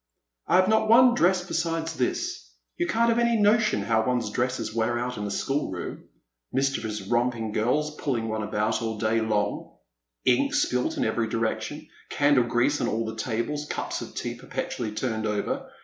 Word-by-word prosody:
*' - - -49
I - - +3
have 185 0 +5
not 220 0 +2
one 245 +2 +7
dress 180 -5 +2
besides 165 -2 -1
this. 125 - -2 0.3
You 175 - -1
can't 230 +7 +2
have 230 0 +2
any 235 -1 +3
notion 215 +1 +3
how 110 -1 +2
one's 120 -3 0
dresses 125 0 -1
wear 115 +1 0
out 125 +1 -2
in 105 - -3
a - - -4
schoolroom 100 -4 -3 0.2
— - - -58
mischievous 125 -6 -1
romping 120 0 0
girls 150 +8 0
puUing 120 -6 -1
one 110 0 -2
about 105 +2 -1
all 110 -1 -3
day 110 +1 +1
long, 105 -2 -1 0.5
ink 280 - +3
spilt 125 - +1
in - - +1
every 110 +1 0
direction, 115 0 -2 0.2
candle 145 -4 +3
grease 125 +5 +1
on - - +1
all 115 +1 -1
the 110 0 -5
tables, 120 +6 -2
cups - - -3
of - - -8
tea - - -3
perpetually 115 -3 -4
turned 110 -1 -2
over. 260 - -2
120 Hz, 180 wpm, -26 LUFS, 110-165 Hz, 0.5 s, one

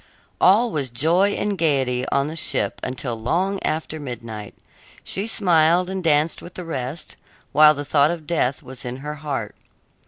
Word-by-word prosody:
All 220 +5 +5
was 140 -6 -2
joy 170 +11 +2
and 205 -1 -1
gaiety 135 -7 +1
on 140 0 +1
the 155 +2 -5
ship 165 - -1
until 120 -3 -4
long 190 - 0
after 155 0 -2
midnight. 115 -6 -7 0.5
She 195 +3 -4
smiled 175 -3 +3
and 190 -1 -4
danced 155 0 +2
with 175 - -11
the 180 - -6
rest, 140 0 -4 0.3
while 150 +1 +7
the 145 0 -5
thought 145 +1 +3
of 165 -2 -4
death 140 -5 0
was 130 +1 -10
in 125 0 -5
her 150 - -3
heart. 140 -8 -4
150 Hz, 165 wpm, -22 LUFS, 130-175 Hz, 0.5 s, while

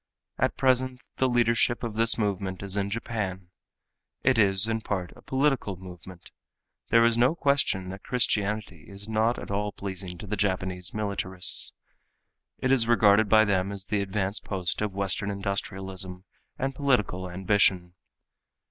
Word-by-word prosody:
At - - +1
present 130 -1 +2 0.2
the 130 - +2
leadership 120 0 +2
of 115 -2 -3
this 115 +1 +2
movement 100 -3 -2
is 100 0 -2
in 100 -1 -1
Japan. 100 -5 -4 0.7
It 130 -3 +3
is 95 0 +4
in 110 0 -1
part 95 -5 -3
a - - -16
political 135 -7 0
movement. 90 -1 -12 0.6
There 115 +1 +5
is 115 0 +3
no 125 +7 +4
question 140 - +1
that 95 +1 -8
Christianity 105 -7 -1
is 100 +1 -8
not 110 +2 +1
at - - -7
all 105 +1 -1
pleasing 95 -3 -6
to 95 - -9
the 105 +1 -2
Japanese 95 -2 -1
militarists. 100 -3 0 0.8
It 130 - 0
is 120 -4 +4
regarded 110 -2 +5
by 110 +1 +6
them 95 -1 0
as 100 -1 -6
the 105 -1 0
advance 100 +1 -2
post 95 -2 -3
of 105 -1 -1
western 100 +1 0
industrialism 95 -2 -3 0.3
and 135 +1 -2
political 120 -10 0
ambition. 90 -1 +1
100 Hz, 150 wpm, -27 LUFS, 95-115 Hz, 0.8 s, by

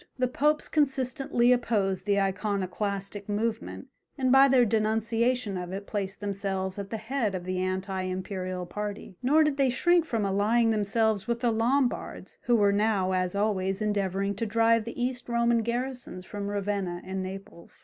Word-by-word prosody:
The 255 -1 +1
Popes 300 +4 +1
consistently 270 -3 +1
opposed 210 -6 +1
the 200 -1 +3
Iconoclastic 200 +1 -2
movement, 225 +5 -3 0.3
and 260 -2 +1
by 270 +1 +7
their 255 -2 +5
denunciation 225 0 0
of 180 0 -6
it 195 +1 -5
placed 200 -1 -4
themselves 195 -1 -3
at 195 -1 -6
the 225 - -3
head 220 -2 -2
of 180 - -4
the 185 0 -2
anti 185 +1 -2
imperial 185 0 -4
party, 205 +1 -6
nor 300 +5 +4
did 300 -2 0
they 275 -2 +3
shrink 345 +6 +3
from 225 -9 -1
allying 215 +4 +2
themselves 215 0 +1
with 235 0 -1
the 240 -2 +2
Lombards, 245 +4 -1
who 240 - +4
were 205 -2 +4
now, 205 -3 +1
as 185 0 0
always, 195 -2 0
endeavouring 200 -2 0
to 230 +1 -2
drive 230 +1 +3
the 235 - -7
East 245 0 -2
Roman 235 0 +2
garrisons 240 -5 -3
from 200 0 -5
Ravenna 200 -3 -2
and 190 0 -3
Naples. 185 -2 -9
210 Hz, 165 wpm, -28 LUFS, 195-240 Hz, 0.3 s, by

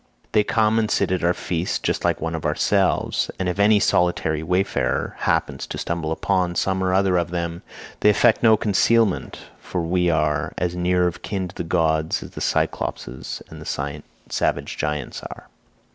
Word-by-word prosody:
They 105 - +4
come 110 +1 +2
and 110 -1 0
sit 100 -3 +1
at 90 -2 0
our 85 +1 +3
feasts 85 0 -2
just - - -2
like - - +1
one 80 +1 -3
of 80 -2 -4
our - - 0
selves, - - +1
and 95 - -2
if 90 +2 -2
any 105 +1 +5
solitary 85 -5 +1
wayfarer 90 +4 0
happens - - 0
to - - -5
stumble 85 -2 -3
upon 90 +1 0
some 95 +2 0
one 95 0 0
or - - +1
other 95 -1 +3
of 85 -1 0
them, 85 -1 -3 0.4
they 105 - +5
affect 110 +2 +4
no 110 -2 +6
concealment, 105 +1 +2 0.2
for 90 - -4
we 90 +1 +1
are 75 -2 0
as 90 0 -1
near 90 0 +2
of 90 -1 -2
kin 95 -3 -3
to 90 - -14
the - - -3
gods 80 -2 +1
as - - -11
the - - -8
Cyclopes - - -1
and 65 - -8
the 75 +1 -4 0.3
savage 70 0 -1
giants 75 -2 -3
are." - - -9
90 Hz, 190 wpm, -22 LUFS, 80-95 Hz, 0.4 s, no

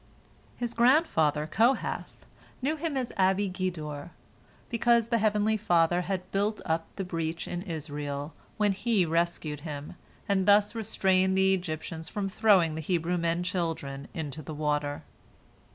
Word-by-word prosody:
His 240 -1 -3
grandfather 235 - +3
Kohath 230 - 0 0.3
knew 285 +5 0
him 310 -2 -3
as 255 -2 -2
Abi 190 +1 +3
Gedor, 160 -6 -4 0.6
because 235 -1 +2
the 235 -1 +2
Heavenly 215 0 +2
Father 175 -4 +3
had 185 0 -4
"built 205 +2 0
up" 165 0 -1
the 195 - -3
breach 165 -2 -3
in 175 - -3
Israel, 145 -4 -5 0.2
when 210 -1 +3
He 200 -1 +1
rescued 165 -2 -1
him, 150 0 -7 0.3
and 190 -2 +1
thus 205 +1 +5
restrained 190 -4 +1
the 190 0 +4
Egyptians 165 -2 -4
from 200 -2 -2
throwing 195 -6 +4
the 160 - -4
Hebrew 175 +1 0
men 170 +1 0
children 165 -6 -3
into 155 -2 -4
the 155 +1 -7
water. 150 -1 -1
180 Hz, 140 wpm, -28 LUFS, 160-210 Hz, 0.6 s, thus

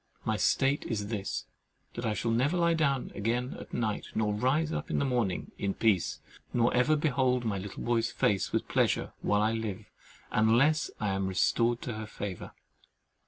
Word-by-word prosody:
My 110 - +1
state 135 +6 +2
is 105 -3 -2
this, 100 -4 -3 0.5
that 120 0 -3
I 105 - 0
shall 115 +3 -1
never 135 +9 +2
lie 170 -1 +3
down 140 -5 0
again 120 +5 -1
at - - -10
night 110 -3 -2
nor 105 -1 +1
rise 140 +9 +1
up - - -3
in - - 0
the 140 - +1
morning 120 -8 -1
in 100 -1 -1
peace, 105 -6 +1 0.3
nor 120 0 +3
ever 125 +5 +4
behold 130 -5 +1
my 100 -3 -1
little 95 +1 -7
boy's 115 -1 +1
face 100 -2 +1
with - - -1
pleasure - - +1
while 105 0 +2
I 110 - +2
live—unless 110 +5 0
I 105 - 0
am 95 0 0
restored 115 +5 +1
to 120 - -3
her 110 0 -6
favour. 100 -3 -6
115 Hz, 175 wpm, -30 LUFS, 105-130 Hz, 0.5 s, ever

